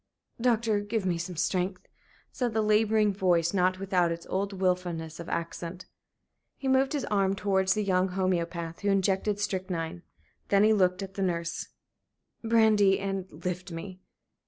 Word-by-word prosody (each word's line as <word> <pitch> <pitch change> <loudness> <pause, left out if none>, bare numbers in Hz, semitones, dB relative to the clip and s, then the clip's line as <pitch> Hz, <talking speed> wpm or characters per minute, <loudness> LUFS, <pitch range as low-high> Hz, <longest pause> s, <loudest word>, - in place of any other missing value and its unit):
"Doctor, 230 -3 +2
give 205 0 -2
me 175 -2 0
some 175 +1 -5
strength," 185 +2 -1 0.5
said 245 -3 -2
the 220 - +2
laboring 215 0 +3
voice, 175 -3 +2
not 185 -1 +2
without 185 -3 +1
its 170 0 -5
old 195 +2 -1
wilfulness 180 -4 -2
of 170 - -7
accent. 170 +1 -4 0.7
He 270 - -4
moved 265 +2 +3
his 285 -3 -1
arm 195 -1 +2
towards 190 -1 +1
the 215 - 0
young 185 -1 +2
homoeopath, 170 -3 -2
who 205 - -1
injected 195 +1 +1
strychnine. 180 -4 -3 0.5
Then 200 0 +4
he 220 +1 +5
looked 185 -2 +2
at 195 0 -8
the 195 - -4
nurse. 170 -2 -2 0.8
"Brandy 220 -4 +4
and 195 -1 -3
lift 180 +3 -5
me." 185 +3 -7
190 Hz, 155 wpm, -28 LUFS, 180-205 Hz, 0.8 s, he